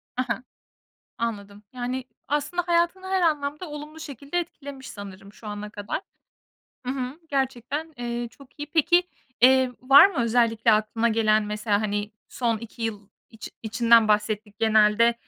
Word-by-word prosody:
Ha 255 - 0
ha. 250 - -2 0.7
Anladım. 205 -3 -4
Yani 250 +1 -3 0.2
aslında 295 +5 -1
hayatını 345 +2 +1
her 380 0 +1
anlamda 300 0 0
olumlu 295 +1 -8
şekilde 285 +2 -4
etkilemiş 280 -5 -8
sanırım 200 -1 -10
şu 215 - -12
ana 210 0 -5
kadar, 205 - -4 0.9
hı 255 - 0
hı, 265 +3 -5
gerçekten, 275 +3 -2
eee, 240 0 -3
çok 270 +3 -19
iyi. 295 - -4
Peki, 340 +3 +4 0.4
eee, 260 +1 +6
var 275 +6 +8
mı 390 -7 -5
özellikle 230 -1 +3
aklına 215 +2 +1
gelen 215 -1 +3
mesela, 210 0 0
hani, 205 0 -2 0.2
son 230 -3 -1
2 230 +1 -10
yıl 210 -3 -4 0.2
iç 225 - -9
içinden 230 0 +4
bahsettik 210 0 0
genelde. 220 +1 +4
235 Hz, 145 wpm, -25 LUFS, 215-285 Hz, 0.9 s, var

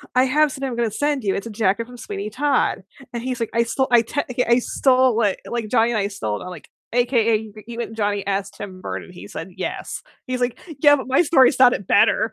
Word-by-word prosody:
I 255 - +5
have 295 +3 +3
something 270 0 -4
I'm 245 - -4
gonna 235 -1 0
send 290 +3 -1
you, 195 -2 0
it's 200 - -4
a - - -7
jacket 210 +1 0
from 245 0 -12
Sweeney 205 -2 -5
Todd," 270 -3 0 0.3
and 235 - -3
he's, 255 -1 -3
like, 230 - -3
"I 235 - +3
stole 265 +3 -1
I 240 -1 +7
technica 250 0 -2
I 235 +1 +5
stole 255 -2 +2
it, 200 -2 +1
like, 235 -2 -3
Johnny 230 0 +3
and 225 - 0
I 200 - 0
stole 150 - -4
it." - - -8
I'm, - - -6
like, 175 -4 -11 0.2
"AKA 230 -3 +1 0.2
you 235 0 -7
and 225 -1 -5
Johnny 205 -2 -1
asked 195 0 -2
Tim 190 -3 -9
Burton, - - -5
and - - -14
he - - -10
said - - -7
yes." - - -5 0.3
He's, 255 0 -3
like, 245 -1 -1 0.2
"Yeah, 290 0 +7
but 265 - -6
my 265 +5 +4
story 285 -6 +5
sounded 250 - +3
better." - - +3
235 Hz, 245 wpm, -21 LUFS, 210-255 Hz, 0.3 s, I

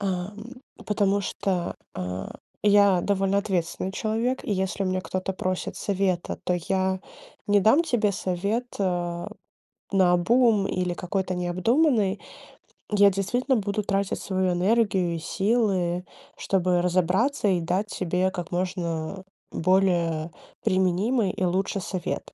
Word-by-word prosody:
Ам, 190 0 -3 0.5
потому 200 -1 +2
что, 185 -2 -2 0.2
э, 90 0 -4 0.4
я 200 -3 +5
довольно 195 0 +1
ответственный 185 -2 -2
человек, 225 +5 -1
и - - -1
если 190 0 -1
у - - -1
меня 185 0 0
кто-то 185 +1 -3
просит 185 0 -3
совета, 190 -3 -1
то 180 - +1
я 190 0 +1 0.5
не 205 0 +4
дам 225 - +5
тебе 225 -9 +1
совет, 200 +6 -1
э, 175 -2 -1 0.7
наобум 195 +4 +4
или 180 -1 -1
какой-то 185 +1 -2
необдуманный. 205 - +1 0.7
Я 205 -1 +6
действительно 245 +8 0
буду 205 0 -1
тратить 195 -1 -1
свою 185 -1 0
энергию 190 -2 +2
и - - -4
силы, 190 -2 0 0.3
чтобы 180 -2 +1
разобраться 185 - +1
и 180 -2 +2
дать 180 +5 -1
тебе 185 -1 0
как 175 -2 -6
можно 175 -1 -3 0.3
более 170 -3 +1 0.3
применимый 190 +4 +2
и - - -4
лучше 190 +3 0
совет. 180 -1 -4
190 Hz, 125 wpm, -25 LUFS, 180-205 Hz, 0.7 s, Я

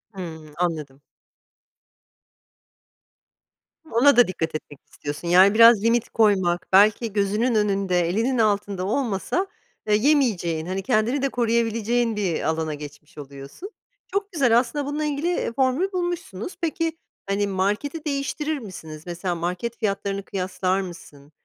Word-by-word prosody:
Hımm, 160 -5 -8
anladım. 150 -6 -2 2.9
Ona 245 +3 +5
da 245 - +7
dikkat 165 -3 -3
etmek 145 -2 -7
istiyorsun. 145 +4 -6
Yani 185 +4 +6
biraz 230 -2 +7
limit 230 +1 +2
koymak, 190 -5 +2
belki 210 +2 +4
gözünün 210 +4 +1
önünde, 195 -3 +1
elinin 230 +7 0
altında 205 -4 0
olmasa, 230 - -1 0.4
eee, 210 - +4
yemeyeceğin, 215 - +1
hani, 185 +2 -3
kendini 220 +8 +1
de 275 - +1
koruyabileceğin 230 -1 0
bir 190 -6 -1
alana 160 0 -1
geçmiş 150 +1 -11
oluyorsun. 140 - -10 0.4
Çok 400 +1 -3
güzel, 245 -8 +4
aslında 270 +3 -3
bununla 295 +2 -2
ilgili, 295 +3 -1
eee, 350 -9 -1
formül 270 +9 +1
bulmuşsunuz. 350 - -4
Peki, 330 0 -1 0.3
hani, 200 +1 +1
marketi 210 - -2
değiştirir 295 +1 -2
misiniz? 160 -8 -9
Mesela 175 +1 -3
market 180 +8 -3
fiyatlarını 200 -1 -2
kıyaslar 185 0 -1
mısın? 150 -5 -11
205 Hz, 125 wpm, -23 LUFS, 180-255 Hz, 2.9 s, da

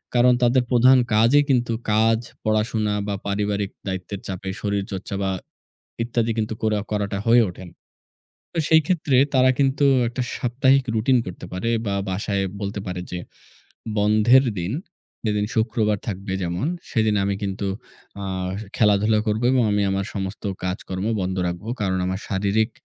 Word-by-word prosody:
কারণ 125 +1 +6
তাদের 125 +1 +4
প্রধান 125 +2 +6 0.2
কাজই 120 +7 +5
কিন্তু 120 -3 +2 0.2
কাজ, 110 +1 +3 0.2
পড়াশোনা 110 -1 0
বা 100 - -1
পারিবারিক 100 0 -1 0.2
দায়িত্বের 95 +1 -4
চাপে 95 0 -5
শরীরচর্চা 100 -1 -3
বা 95 - 0 0.7
ইত্যাদি 115 -1 0
কিন্তু 110 0 -1
কোরা 110 -1 +1
করাটা 100 -1 -1
হয়ে 120 0 +6
ওঠে 90 +1 -10
না। - - -21 0.8
তো - - -2
সেই 160 0 +6
ক্ষেত্রে 155 -7 +1 0.2
তারা 130 0 +5
কিন্তু 140 +1 +2 0.2
একটা 120 +2 -3
সাপ্তাহিক 130 +2 +2
routine 120 +3 +3
করতে 90 0 -7
পারে 95 +6 -2 0.2
বা 100 - 0 0.2
বাসায় 100 +1 -1 0.2
বলতে 100 0 -3
পারে 90 -1 -4
যে 90 - -3 0.8
"বন্ধের 110 +5 +5 0.2
দিন 90 +5 -3 0.5
যেদিন 105 -1 +1
শুক্রবার 110 -2 +1
থাকবে 95 -1 -4
যেমন, 90 - -2 0.2
সেদিন 110 -4 +2
আমি 100 0 0
কিন্তু 100 0 -2 0.6
আ - - -4 0.5
খেলাধুলা 105 0 +3
করব 105 +2 0
এবং 130 -2 +3
আমি 105 0 +2
আমার 95 0 -1
সমস্ত 95 -1 -4 0.2
কাজকর্ম 95 +2 -3
বন্ধ 95 0 -2
রাখব। 90 +2 -4 0.2
কারণ 95 -2 0
আমার 95 +2 -2
শারীরিক 100 +3 +1
105 Hz, 150 wpm, -23 LUFS, 100-120 Hz, 0.8 s, কারণ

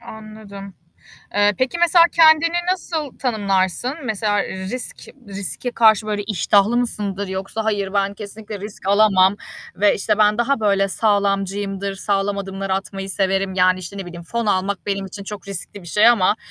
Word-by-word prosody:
Anladım. 215 -4 -11 0.6
Eee, 205 0 +3
peki 260 +6 -1
mesela 345 0 +6
kendini 330 +1 +5 0.2
nasıl 320 -6 -4
tanımlarsın? 200 -1 0
Mesela, 210 -2 0
eee, 190 0 -6
risk 245 +6 -5 0.3
riske 200 +5 -4
karşı 220 -2 +4
böyle 205 -1 -2
iştahlı 205 +2 +2
mısındır 205 -5 -2
yoksa 195 +4 -4
hayır 205 -3 -1
ben 200 0 0
kesinlikle 210 +1 -8
risk 205 0 -9
alamam 200 -1 +4 0.4
ve, 205 +1 +3
işte, 210 +1 0
ben 210 0 +3
daha 245 +3 +1
böyle 200 -2 +2
sağlamcıyımdır, 200 -1 -1
sağlam 200 0 -1
adımlar 195 0 -5
atmayı 195 0 -3
severim. 195 0 0
Yani 185 0 +3
işte, 185 +2 -8
ne 195 - -6
bileyim 175 -1 -9
fon 235 +6 -3
almak 195 -1 -1
benim 195 -1 -2
için 200 +1 -9
çok 200 -1 -8
riskli 200 +1 -6
bir 175 - -13
şey 210 +7 +4
ama 210 -4 +4
200 Hz, 160 wpm, -20 LUFS, 195-220 Hz, 0.6 s, mesela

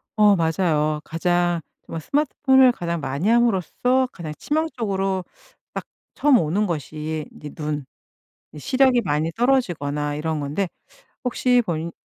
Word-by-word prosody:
어 210 -2 +6
맞아요. 160 -3 +1
가장 175 +1 +1 0.2
정말 165 - -6
스마트폰을 265 - +4
가장 170 -4 -3
많이 140 +8 -1
함으로써 240 +3 +2
가장 155 -4 -7
치명적으로 200 - -1 0.5
딱 - - -4 0.3
처음 285 -4 +4
오는 180 +7 +1
것이 155 -1 -4
이제 150 - -9
눈. 150 -3 -3 0.7
이 150 - -10
시력이 255 - +3
많이 155 -1 0
떨어지거나 160 - 0
이런 155 +1 -2
건데 150 +7 -2 0.6
혹시 250 0 +2
본인이 165 0 -2
175 Hz, 290 characters per minute, -23 LUFS, 155-240 Hz, 0.7 s, 어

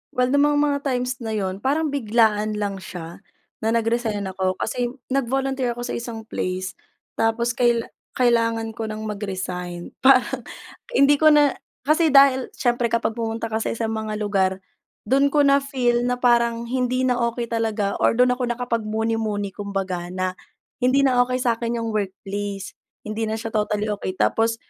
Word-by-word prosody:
Well 250 0 +2
nung 285 +1 +4
mga 295 0 +2
mga 285 -1 +1
times 250 0 -1
na 220 -2 -3
yun, 190 -2 -2
parang 295 +6 0
biglaan 215 -4 +2
lang 200 -2 -3
siya 170 -3 -8 0.4
na 220 - -2
nag-resign 225 -2 0
ako 185 0 -1
kasi 245 +5 -2 0.2
nag-volunteer 265 -1 0
ako 240 - -5
sa 245 - -4
isang 235 -2 -6
place. 185 -3 -4 0.4
Tapos 235 +1 +1
kaila 235 -1 +1 0.3
kailangan 230 -2 +2
ko 225 -1 -4
ng 215 0 -5
mag-resign. 185 -4 -5
Parang 265 -1 +4 0.5
hindi 285 -3 +5
ko 310 - +5
na 295 -2 +5 0.3
kasi 310 +4 +3
dahil 275 -2 +5
siyempre 240 -1 +1
kapag 230 -1 0
pumunta 225 -1 -3
ka 220 - 0
sa - - -2
isang 225 -1 -2
mga 220 -1 -3
lugar, 195 -3 +1 0.5
dun 275 +5 +3
ko 290 0 +3
na-feel 270 -4 +2
na 250 - +1
parang 235 -1 +3
hindi 255 +1 0
na 250 -1 +1
okey 235 0 -4
talaga, 220 -3 0
or - - +4
dun 250 +1 +4
ako 250 0 -1
nakapagmuni-muni 225 -3 -1
kumbaga 195 -4 -3
na 185 0 -2 0.5
hindi 265 +2 +4
na 255 -2 +3
okey 255 +1 -2
sakin 235 -1 0
yung 225 - -2
workplace. 200 -1 -4 0.4
Hindi 220 +1 -2
na 220 - -1
siya 225 0 -5
totally 210 0 0
okey. 195 -2 -4
Tapos 225 +4 +2
230 Hz, 165 wpm, -23 LUFS, 210-250 Hz, 0.5 s, hindi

